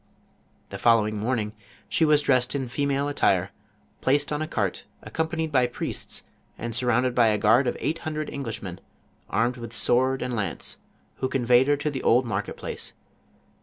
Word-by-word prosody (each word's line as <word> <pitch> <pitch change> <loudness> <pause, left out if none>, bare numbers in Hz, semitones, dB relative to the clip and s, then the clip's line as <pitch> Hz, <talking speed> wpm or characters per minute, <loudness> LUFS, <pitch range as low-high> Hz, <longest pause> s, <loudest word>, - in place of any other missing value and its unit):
The - - -7
following 110 -2 +4
morning 110 0 -1 0.3
she 160 +10 +2
was 150 -1 +4
dressed 125 -1 +2
in 135 -3 -2
female 140 +2 0
attire, 100 -9 +2 0.5
placed 145 +2 +2
on 150 - -2
a 155 - -2
cart, 100 - -2 0.2
accompanied 160 -1 -2
by 130 -3 +3
priests, 120 - -4 0.3
and 115 0 -4
surrounded 125 +1 +2
by 120 -2 +4
a 105 -1 +3
guard 115 +6 +4
of - - -1
eight 155 +7 -1
hundred 155 -1 -3
Englishmen, 110 -9 -5 0.5
armed 120 +5 +1
with 115 -1 -8
sword 130 +3 +2
and 125 -1 -2
lance, 100 -6 -3 0.4
who 130 - -1
conveyed 125 0 +4
her 145 0 +3
to 150 +1 -2
the 135 - -4
old 125 +2 +4
market 105 -3 -3
place. - - -6
125 Hz, 165 wpm, -26 LUFS, 115-140 Hz, 0.5 s, following